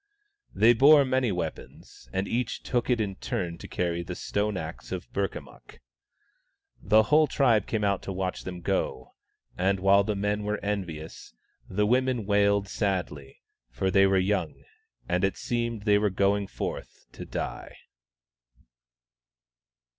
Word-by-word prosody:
They 115 +2 +6
bore 140 +4 +6
many 130 -3 +1
weapons, 80 -7 -7
and 95 +6 -2
each 120 0 -2
took 120 -1 -1
it 125 -2 +2
in 100 -3 -2
turn 85 -2 -4
to - - -9
carry 85 -1 -2
the 85 - -6
stone 105 -1 -2
axe 80 -2 -7
of 95 -2 -6
Burkamukk. 100 0 -5 1.0
The 110 0 +4
whole 150 +5 +4
tribe 115 -9 +2
came 110 -2 -1
out 100 -1 +1
to - - -6
watch 95 -1 -3
them 90 -1 -7
go, 95 +2 -2 0.5
and 95 +1 +1
while 100 +1 +5
the 105 +1 -2
men 105 +1 -1
were 105 +1 -2
envious, 85 -10 -5 0.3
the 105 +2 +1
women 125 0 +1
wailed 100 0 +2
sadly, 90 -10 -3 0.3
for 65 +11 -1
they 95 0 +5
were 95 0 +3
young, 95 +2 -1 0.4
and 90 +1 0
it 95 -1 +1
seemed 115 -2 -2
that - - -14
they 105 -1 +4
were 105 0 +2
going 100 +1 +1
forth - - -6
to - - -9
die. - - -6
100 Hz, 150 wpm, -27 LUFS, 95-110 Hz, 1.0 s, They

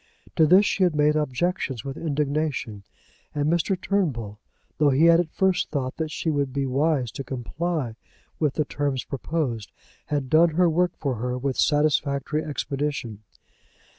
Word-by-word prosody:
To 160 - +5
this 185 +5 +6
she 200 - -1
had 175 -4 +2
made 150 0 +3
objections 150 - -1
with 135 -1 -4
indignation, 145 -7 -2 0.5
and 145 0 0
Mr. 170 +3 +1
Turnbull, 125 - -1 0.4
though 150 -1 +5
he 140 +4 +4
had 170 0 +6
at 175 -2 0
first 190 +2 +1
thought 130 -4 -3
that 160 -1 -2
she 160 +1 -2
would 140 -3 -1
be 140 +1 -1
wise 135 -2 +1
to 135 - -6
comply 135 0 -3 0.4
with 150 -4 +1
the 150 - +1
terms 140 -3 -2
proposed, 135 -5 -3 0.4
had 145 -3 -1
done 160 +3 +4
her 180 +1 +4
work 175 +2 +1
for 135 -5 -2
her 125 +2 -2
with 130 0 -2
satisfactory 150 0 +1
expedition. 140 -6 -3
150 Hz, 160 wpm, -25 LUFS, 135-160 Hz, 0.5 s, this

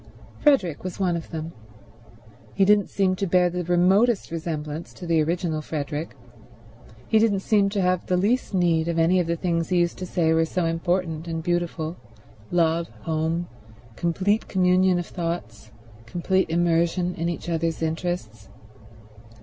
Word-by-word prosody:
Frederick 225 - +2
was 185 +1 -6
one 180 -3 +1
of 165 - -6
them. 160 0 -5 1.0
He 195 - +4
didn't 205 0 +4
seem 190 -2 +1
to 195 - -1
bear 180 0 +3
the 180 0 -3
remotest 190 +6 +3
resemblance 160 -1 -5
to 180 - -9
the 165 -2 +2
original 165 0 -1
Frederick. 150 -2 -4 0.9
He 220 - +4
didn't 210 -3 +2
seem 200 -1 +2
to 200 -1 -1
have 180 -1 0
the 180 - +2
least 220 +8 +1
need 170 -4 +2
of 170 -1 -1
any 165 +3 +4
of 175 - 0
the 170 - 0
things 165 -1 -1
he 180 - +2
used 175 0 +1
to 185 - -5
say 160 -2 +1
were 165 0 +3
so 180 +1 -1
important 165 0 -1
and 165 -1 -3
beautiful—love, 170 0 -2
home, 165 +2 -1 0.5
complete 185 - 0
communion 185 0 +3
of 175 - -2
thoughts, 165 - -5 0.4
complete 185 +6 0
immersion 170 +1 +1
in 170 0 -2
each 170 - -5
other's 165 -1 -1
interests. 160 - -3
175 Hz, 155 wpm, -24 LUFS, 165-185 Hz, 1.0 s, He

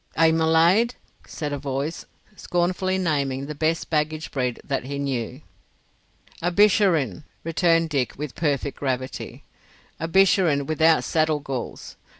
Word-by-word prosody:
"A 160 0 +5
Mulaid?" 165 +9 +3 0.3
said 150 -3 -4
a 145 - -3
voice, 140 +4 -4 0.3
scornfully 185 +1 -1
naming 140 -6 -1
the 150 - -5
best 160 +3 -1
baggage 155 0 -1
breed 125 -3 -2
that 135 -3 -3
he 140 +1 -4
knew. 130 -1 -3 1.0
"A 175 - +1
Bisharin," 180 - +3 0.2
returned 165 0 +2
Dick, 135 -4 -1
with 145 -2 -5
perfect 145 -3 -1
gravity. 130 -1 -4 0.6
"A 165 - -2
Bisharin 175 -5 +3
without 160 +2 +3
saddle 155 -2 +1
galls. 135 -4 -6
155 Hz, 130 wpm, -24 LUFS, 140-165 Hz, 1.0 s, A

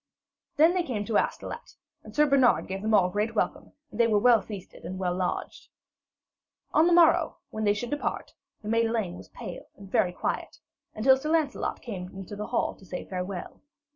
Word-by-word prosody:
Then 320 +3 +5
they 365 - +1
came 230 -10 -3
to 220 -1 +1
Astolat, - - -4 0.3
and - - -12
Sir 300 - +5
Bernard 275 -4 +4
gave 190 +1 -4
them 220 +1 +2
all 180 -3 +4
great 210 +4 -1
welcome, 290 +6 -2 0.2
and 210 - -9
they 235 - +5
were 215 -2 +3
well 230 0 +5
feasted 195 -2 -10
and 185 +2 -5
well 180 -2 -1
lodged. 180 0 -3 1.1
On 315 +2 +5
the - - +3
morrow, 340 -1 +5
when 215 0 -3
they 205 0 +3
should 240 +4 -4
depart, 290 - -3 0.3
the - - -7
maid 230 +1 +2
Elaine 220 -6 -1
was - - -12
pale 195 -8 -8
and 195 -1 -13
very 180 - +3
quiet, - - -3 0.4
until 265 +5 +5
Sir 300 +3 -4
Lancelot 315 -3 0
came 185 -7 -6
into 195 +1 -7
the 210 +1 -5
hall - - 0
to - - -18
say 180 -1 -6
farewell. 185 0 -5
215 Hz, 200 wpm, -27 LUFS, 190-265 Hz, 1.1 s, Then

